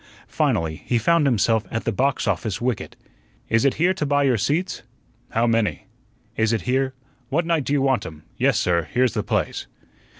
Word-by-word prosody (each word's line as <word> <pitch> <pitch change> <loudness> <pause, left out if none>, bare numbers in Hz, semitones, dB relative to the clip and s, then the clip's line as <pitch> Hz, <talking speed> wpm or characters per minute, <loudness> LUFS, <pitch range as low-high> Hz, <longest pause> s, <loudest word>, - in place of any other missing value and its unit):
Finally 80 -1 0
he 120 - +2
found 160 +5 +3
himself 115 -2 +2
at 115 - -3
the 115 - 0
box 135 +6 0
office 105 -5 -1
wicket. 120 -2 -2 0.5
"Is 115 +4 +2
it 140 - +3
here 175 +3 +2
you 150 - 0
buy 145 0 +2
your 130 -3 +3
seats?" 160 - -1 0.5
"How 115 +1 +1
many?" 115 -2 0 0.5
"Is 110 0 +1
it 115 - 0
here 130 +1 0 0.2
" 130 -3 -37
"What 160 +5 +1
night 165 -5 +1
do 140 - -1
you 140 -2 +2
want 135 -2 +1
'em? 80 -1 -11
Yes, - - +2
sir, 85 -3 +1
here's 125 -1 +2
the - - 0
place." - - -2
125 Hz, 195 wpm, -23 LUFS, 110-140 Hz, 0.5 s, found